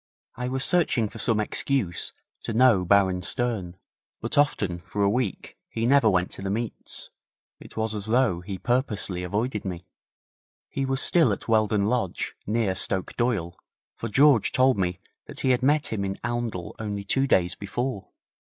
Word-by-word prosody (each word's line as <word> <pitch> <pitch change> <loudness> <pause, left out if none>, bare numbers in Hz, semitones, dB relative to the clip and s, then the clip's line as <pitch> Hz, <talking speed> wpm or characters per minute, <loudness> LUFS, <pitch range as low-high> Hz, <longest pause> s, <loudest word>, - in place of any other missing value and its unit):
I 125 0 -4
was 130 +1 0
searching 155 -10 +2
for - - -10
some 115 -4 +2
excuse 105 -3 -1 0.3
to - - -4
know 115 -5 +5
Baron 95 -1 +3
Stern, 100 -3 0 0.4
but - - -3
often 105 -12 +1
for 100 +3 -3
a 100 - +4
week 115 -4 -3
he 115 0 -2
never 135 -2 +5
went 90 -2 +1
to - - -7
the 95 - -3
meets. 115 +3 -4 0.5
It - - -13
was 110 0 -1
as 105 -1 -2
though 115 -7 +2
he 95 +1 -6
purposely 110 -6 -1
avoided 105 +5 -2
me. 90 -2 -6 0.8
He 135 -1 -2
was 135 0 +1
still 160 -10 +4
at 100 - -4
Weldon 110 -2 +2
Lodge, 110 -5 -1
near 110 -2 +1
Stoke 95 0 0
Doyle, 105 -8 -1 0.4
for 115 - -5
George 135 -1 +4
told 130 0 +4
me 90 -2 -1 0.3
that - - -6
he 130 - +2
had 125 0 +2
met 145 0 +2
him 100 -2 -2
in 95 0 -3
Oundle 120 -7 -3
only 105 -2 -4
two 135 +7 +1
days 90 -6 +2
before. 105 +2 -4
110 Hz, 170 wpm, -25 LUFS, 95-125 Hz, 0.8 s, know